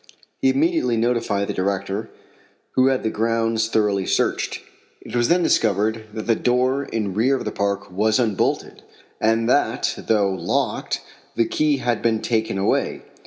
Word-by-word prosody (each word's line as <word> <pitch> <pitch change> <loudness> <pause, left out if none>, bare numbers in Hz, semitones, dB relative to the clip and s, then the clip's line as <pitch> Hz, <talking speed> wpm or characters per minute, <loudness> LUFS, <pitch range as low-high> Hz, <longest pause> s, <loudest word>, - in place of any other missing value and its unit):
He 270 - +4
immediately 310 - +1
notified 115 -4 0
the - - -2
director, 100 +3 -2 0.6
who 130 0 +3
had 135 -1 +1
the 110 - 0
grounds 115 0 0
thoroughly 105 -4 +1
searched. - - 0 0.4
It 115 - -8
was 120 -1 +2
then 175 +1 +3
discovered 110 - +1
that 110 - -4
the 115 - +3
door 125 +4 +1
in 105 -6 -3
rear 120 +7 +2
of 130 - -4
the - - -2
park 100 -1 -2
was 110 +4 +2
unbolted, 110 -6 -1 0.4
and 115 +1 +2
that, 125 -2 +1
though 105 -3 +3
locked, 95 - -1 0.3
the 115 - +2
key 150 +2 +1
had 120 -3 -1
been 115 -2 +1
taken 110 -3 -1
away. 95 - 0
115 Hz, 160 wpm, -22 LUFS, 105-125 Hz, 0.6 s, He